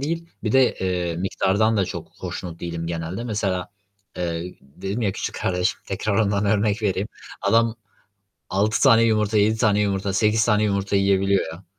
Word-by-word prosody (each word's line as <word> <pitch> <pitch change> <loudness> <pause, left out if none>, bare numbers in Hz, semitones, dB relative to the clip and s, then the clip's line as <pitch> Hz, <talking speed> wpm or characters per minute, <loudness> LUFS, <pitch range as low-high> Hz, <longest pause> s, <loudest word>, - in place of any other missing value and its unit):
değil, 165 +4 -3
bir 110 - -1
de, 130 -2 +4
eee, 90 -3 -1
miktardan 95 +4 +1
da 95 - +2
çok - - -6
hoşnut 85 -2 -6
değilim 85 -1 -4
genelde. 85 +6 -4
Mesela, 100 -5 -2 0.5
eee, 85 0 -3
dedim 95 - -5
ya 100 -3 +1
küçük - - -4
kardeşim, 90 0 0
tekrar 100 +2 -2
ondan 100 -1 +1
örnek 105 +1 +1
vereyim. 100 0 0 0.3
Adam 115 +3 +3 0.7
6 105 +3 +1
tane 115 0 +6
yumurta, 110 -1 +2
7 110 +2 +3
tane 105 -3 +2
yumurta, 100 -1 0
8 105 +2 +3
tane 105 -2 +2
yumurta 100 -1 0
yiyebiliyor 100 -1 +2
ya. 90 +4 -12
100 Hz, 165 wpm, -23 LUFS, 95-110 Hz, 0.7 s, tane